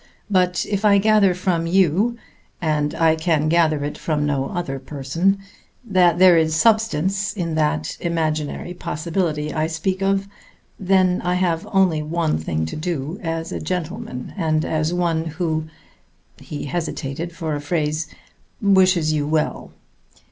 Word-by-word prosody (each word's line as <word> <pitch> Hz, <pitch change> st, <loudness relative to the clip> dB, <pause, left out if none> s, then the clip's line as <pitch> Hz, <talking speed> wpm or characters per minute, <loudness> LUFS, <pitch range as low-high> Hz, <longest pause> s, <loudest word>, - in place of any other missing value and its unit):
But 180 Hz, -2 st, +2 dB
if 200 Hz, 0 st, -2 dB
I 205 Hz, -1 st, +6 dB
gather 200 Hz, -2 st, +4 dB
from 175 Hz, -2 st, 0 dB
you 190 Hz, +6 st, +2 dB, 0.4 s
and 150 Hz, -3 st, 0 dB
I 160 Hz, -1 st, +3 dB
can 160 Hz, -2 st, +1 dB
gather 155 Hz, -3 st, +2 dB
it 145 Hz, -, -5 dB
from 150 Hz, -2 st, -1 dB
no 140 Hz, -2 st, 0 dB
other 175 Hz, -8 st, -3 dB
person 150 Hz, +8 st, 0 dB, 0.5 s
that 180 Hz, -5 st, +3 dB
there 180 Hz, -2 st, +7 dB
is 160 Hz, -1 st, +1 dB
substance 200 Hz, -1 st, +2 dB
in 170 Hz, -5 st, -3 dB
that 150 Hz, -, 0 dB
imaginary 160 Hz, 0 st, -2 dB
possibility 160 Hz, -2 st, -2 dB
I 155 Hz, 0 st, 0 dB
speak 180 Hz, +4 st, -2 dB
of, 195 Hz, 0 st, +1 dB, 0.5 s
then 185 Hz, -1 st, +2 dB
I 180 Hz, 0 st, +1 dB
have 175 Hz, -3 st, 0 dB
only 185 Hz, -5 st, +3 dB
one 155 Hz, -, -1 dB
thing 80 Hz, 0 st, -2 dB
to 80 Hz, -, -6 dB
do 160 Hz, +1 st, -3 dB
as 165 Hz, -2 st, -3 dB
a -, -, -3 dB
gentleman 160 Hz, -6 st, -4 dB
and 160 Hz, -4 st, 0 dB
as 155 Hz, +1 st, 0 dB
one 170 Hz, -2 st, 0 dB
who" 160 Hz, -1 st, -2 dB, 0.7 s
he 150 Hz, -, -7 dB
hesitated 160 Hz, 0 st, -4 dB
for 160 Hz, -3 st, -3 dB
a 145 Hz, -, -3 dB
phrase 155 Hz, 0 st, -1 dB, 0.5 s
"wishes 185 Hz, -5 st, +3 dB
you 145 Hz, -1 st, 0 dB
well. 155 Hz, 0 st, -1 dB
165 Hz, 145 wpm, -21 LUFS, 155-185 Hz, 0.7 s, there